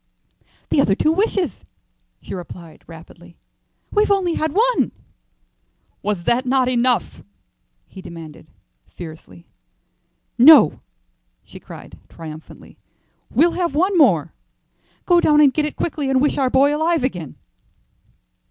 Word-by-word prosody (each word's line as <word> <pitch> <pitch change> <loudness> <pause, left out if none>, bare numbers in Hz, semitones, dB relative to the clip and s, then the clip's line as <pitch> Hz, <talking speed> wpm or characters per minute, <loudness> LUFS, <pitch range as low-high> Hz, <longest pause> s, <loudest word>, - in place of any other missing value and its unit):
"The 280 - +3
other 195 -7 +1
two 310 - +1
wishes," 385 +1 -1 0.6
she - - -8
replied, 170 -3 -10
rapidly. 170 +1 -15 0.5
"We've 420 0 +1
only 380 -4 +1
had 315 -1 -2
one." 475 +7 +1 1.1
"Was 200 -5 -3
not 245 +2 +1
that 255 0 +1
enough?" 245 -1 0 0.7
he 190 - -12
demanded, 165 -3 -12 0.4
fiercely. 165 0 -12 0.9
"No," 280 - +7 0.6
she - - -14
cried, - - -13
triumphantly; 160 -1 -12 0.5
"we'll 335 +5 +2
have 345 -5 -3
one 370 +5 +1
more. 190 - +3 0.7
Go 350 -1 +4
down 300 -1 +3
and 285 -3 +5
get 305 - 0
it 300 - -5
quickly, 295 -4 -3
and 265 -1 +2
wish 290 +1 0
our 265 -2 +1
boy 280 +3 +3
alive 320 -1 0
again." 175 - -4
265 Hz, 125 wpm, -19 LUFS, -, 1.1 s, No